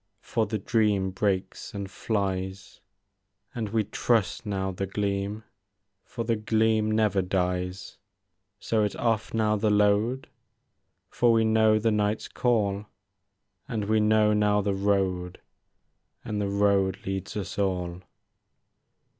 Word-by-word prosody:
For 110 -2 0
the 110 +1 -2
dream 105 -3 +1
breaks 95 +1 -2
and 100 -1 -4
flies; 95 -2 -3 0.7
And 110 -3 -3
we 110 +1 +1
trust 115 +1 0
now 95 -1 -1
the 95 +1 -4
gleam. 100 +1 -2 0.6
For 115 - -5
the 115 0 +1
gleam 110 0 +1
never 105 -3 +2
dies; 90 0 -2 0.3
— 95 +3 -53
So 110 -2 0
it 105 - -1
's - - -10
ofF 115 -2 0
now 105 -1 +2
the 105 +1 +1
load. 105 +5 +2 0.8
For 120 -1 +3
we 115 -1 +3
know 110 -1 +4
the 110 +1 +1
night's 105 0 0
call, 105 -4 0 0.8
And 110 -3 -2
we 110 +1 +2
know 105 0 +4
now 105 0 +3
the 100 0 0
road 95 -2 0 0.9
And 105 -1 -2
the 100 - -1
road 100 -1 +1
leads 95 +1 -4
us 100 0 -5
all. 90 -3 -1
105 Hz, 135 wpm, -27 LUFS, 95-110 Hz, 0.9 s, know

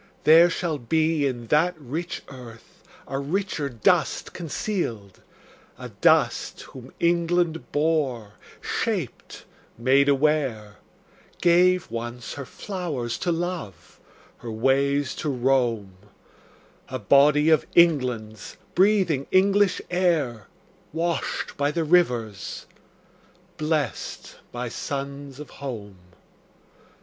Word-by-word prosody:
There 165 +3 +7
shall 165 -3 -2
be 155 +3 +1
In 120 -3 -4
that 170 +4 +3
rich 160 +5 -5
earth 120 -4 -13 0.3
a 135 0 -3
richer 150 -1 -2
dust 115 -4 +1
concealed; 145 - -4 0.6
A - - -8
dust - - +2
whom 130 -1 -12
England 170 -1 +1
bore, 145 -8 0 0.3
shaped, - - -3 0.3
made 135 +4 +3
aware, 135 -7 0 0.6
Gave, 180 -2 +3
once, 120 +1 -5
her 140 - -7
flowers 160 - -4
to 175 - 0
love, 165 - -5 0.4
her 120 - -8
ways 135 +4 +1
to 150 - -2
roam, 120 -6 0 1.0
A - - -3
body 150 +2 +4
of 155 - +3
England's, 125 - +2 0.2
breathing 185 -8 +2
English 195 0 +3
air, 155 - 0 0.5
Washed 170 +1 -2
by 145 0 +1
the 165 +2 -1
rivers, 125 - 0 0.9
blest 155 -5 -3
by 125 0 -4
suns 140 +2 -6
of 150 - -9
home. 105 -8 -7
145 Hz, 100 wpm, -24 LUFS, 120-170 Hz, 1.0 s, There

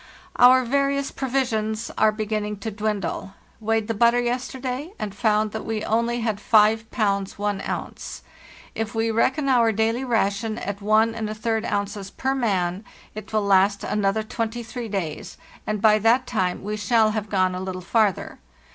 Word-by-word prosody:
"Our 255 +1 +7
various 280 +2 0
provisions 230 -5 -1
are 220 0 +4
beginning 210 -1 -3
to 220 - -3
dwindle. 205 -2 -3 0.2
Weighed 225 -1 0
the 225 - -1
butter 235 +3 +4
yesterday, 255 +5 -3
and 205 -2 -4
found 215 0 +1
that 220 - -5
we 220 -1 -3
only 235 +2 0
had 220 -3 -2
5 220 +1 +4
pounds 200 -3 -1
1 205 -1 -2
ounce. - - -6 0.5
If 225 0 -4
we 225 0 +1
reckon 265 +6 +1
our 240 -4 +4
daily 225 +4 0
ration 220 -2 0
at 200 -4 -4
14 220 +2 +2 0.4
ounces 200 -2 -3
per 265 +6 -2
man 195 -7 0 0.3
it 215 -1 -9
will 215 -1 +1
last 200 +1 +3
another 210 +1 0
23 230 +2 -4
days, 175 -7 -4 0.3
and 215 -1 -1
by 215 -1 +6
that 235 +4 +3
time 185 -8 -1
we 210 +1 -3
shall 215 +1 +3
have 215 -1 -3
gone 185 -2 +2
a 180 - -4
little 185 -1 -4
farther. 205 +1 0
220 Hz, 155 wpm, -23 LUFS, 205-235 Hz, 0.5 s, Our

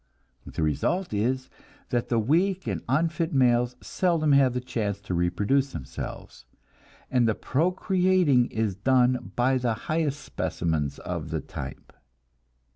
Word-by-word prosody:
The 80 - -3
result 140 - 0
is 130 +5 0 0.4
that 120 -1 -1
the 120 - +2
weak 175 - +1
and - - -2
unfit 165 +4 +1
males 125 -2 +3
seldom 165 -5 +1
have 135 -3 +4
a - - +1
chance 110 -5 -3
to 100 -2 -5
reproduce 100 +11 +1
themselves, 65 -3 -7 0.6
and 125 -3 +3
the 110 - +1
procreating 180 - +2
is 110 -3 -1
done 125 +3 +2
by 130 +2 +2
the 120 -3 0
highest 150 +3 -2
specimens 75 - -2
of - - -5
the - - -1
type. - - -8
125 Hz, 130 wpm, -26 LUFS, 110-155 Hz, 0.6 s, have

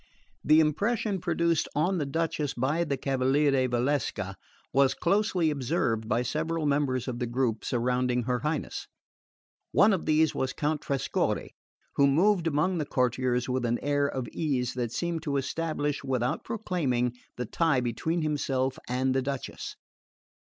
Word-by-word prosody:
The 155 +1 +6
impression 200 +5 0
produced 170 -2 +1
on 175 +5 +1
the 145 - -1
Duchess 155 -1 -1
by 140 +7 +1
the 140 -4 -2
cavaliere 135 0 +2
Valsecca 120 -6 -1 0.4
was 135 0 +4
closely 180 -3 +2
observed 120 -6 -1
by 120 - +2
several 155 +5 -1
members 140 -3 +1
of 120 -2 -3
the 125 - -1
group 120 -2 -1
surrounding 125 0 0
her 125 +1 0
Highness. 150 +2 -3 0.8
One 205 +1 +5
of 185 - -2
these 155 0 +3
was 130 0 -1
Count 150 0 -1
Trescorre, 140 -1 -1 0.5
who 140 - +6
moved 170 +5 +3
among 165 +4 +1
the 150 - -1
courtiers 125 -1 +1
with 130 -1 -1
an 120 0 +1
air 145 0 +2
of 130 -3 -3
ease 130 -6 -1
that 120 -2 -2
seemed 170 +5 -2
to 145 -3 -1
establish 150 0 -2
without 125 -2 -1
proclaiming 150 - -1 0.2
the 125 - -2
tie 155 +3 +2
between 155 +8 -1
himself 135 -3 -1
and 130 +1 +1
the 135 - +1
Duchess. 135 0 -5
140 Hz, 150 wpm, -28 LUFS, 125-160 Hz, 0.8 s, The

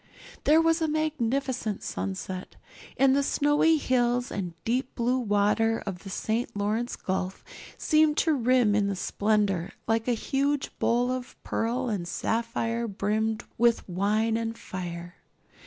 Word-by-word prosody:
There 310 +2 +6
was 330 0 +3
a 320 - +2
magnificent 275 -7 -1
sunset, 95 - -5 0.4
and 270 0 +5
the 280 - +3
snowy 295 +3 +3
hills 245 -3 +1
and 180 -4 -4
deep 250 +3 -1
blue 250 +2 +1
water 220 0 +2
of 190 -3 -4
the 195 - -10
St. 220 +3 -2
Lawrence 215 +4 -1
Gulf 185 0 -3 0.3
seemed 310 -1 +3
to 320 - +3
rim 250 -4 +3
in 205 -1 +2
the 200 - -1
splendor 200 -2 0
like 225 +1 +1
a 245 - +3
huge 275 +4 -1
bowl 245 +2 +2
of 255 -1 -5
pearl 245 +3 -1
and 200 -7 -2
sapphire 230 +3 -1
brimmed 215 +2 -1 0.2
with 235 -1 +3
wine 210 +5 +1
and 230 0 -3
fire. 175 -2 -7
230 Hz, 140 wpm, -27 LUFS, 205-255 Hz, 0.4 s, There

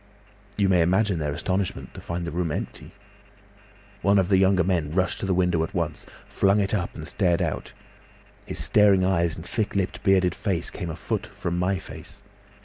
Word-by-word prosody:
"You 100 -2 +3
may 90 -2 +4
imagine 95 +1 +2
their 75 -1 -1
astonishment 95 +5 -2
to - - -9
find 85 0 -4
the 85 - -4
room 85 -2 -1
empty. - - -5 1.1
One 100 0 +4
of 95 -1 +2
the 95 - +5
younger 95 -1 +4
men 85 -4 0
rushed 95 0 +1
to 95 - -2
the 95 - +2
window 90 -2 +2
at 100 +5 -6
once, 85 -4 -3 0.2
flung 100 +1 +2
it 100 0 0
up 90 -4 -2
and 80 - -7
stared 90 -4 +1
out. - - -3 0.7
His - - -5
staring 100 -3 +4
eyes 85 -3 +1
and 80 - -9
thick 110 +1 -2
lipped 95 -2 -1
bearded 95 -3 +3
face 90 -5 -1
came 90 -4 -5
a 80 - -4
foot 105 +5 -3
from 95 -4 -4
my 95 +2 +1
face. - - -10
95 Hz, 195 wpm, -25 LUFS, 85-100 Hz, 1.1 s, the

